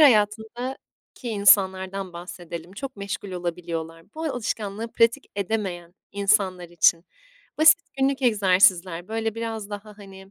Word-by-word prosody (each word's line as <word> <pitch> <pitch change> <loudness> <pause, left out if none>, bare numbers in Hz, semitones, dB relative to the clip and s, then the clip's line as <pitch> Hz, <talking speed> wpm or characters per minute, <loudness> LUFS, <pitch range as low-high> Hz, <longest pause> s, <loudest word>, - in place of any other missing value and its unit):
hayatındaki 225 0 +3 0.5
insanlardan 195 -3 +3
bahsedelim, 170 0 -8
çok 265 +3 -7
meşgul 200 0 -5
olabiliyorlar. 165 -2 -5
Bu 320 - -6
alışkanlığı 225 -5 -3
pratik 230 +4 +2
edemeyen 185 -4 -3 0.2
insanlar 195 -3 +1
için 170 0 +3 0.5
basit 315 +1 +8 0.2
günlük 270 0 +1
egzersizler, 185 -5 +3
böyle, 225 0 -2
biraz 225 -2 -5
daha 205 +1 -7
hani 195 -1 -13
200 Hz, 110 wpm, -24 LUFS, 180-225 Hz, 0.5 s, basit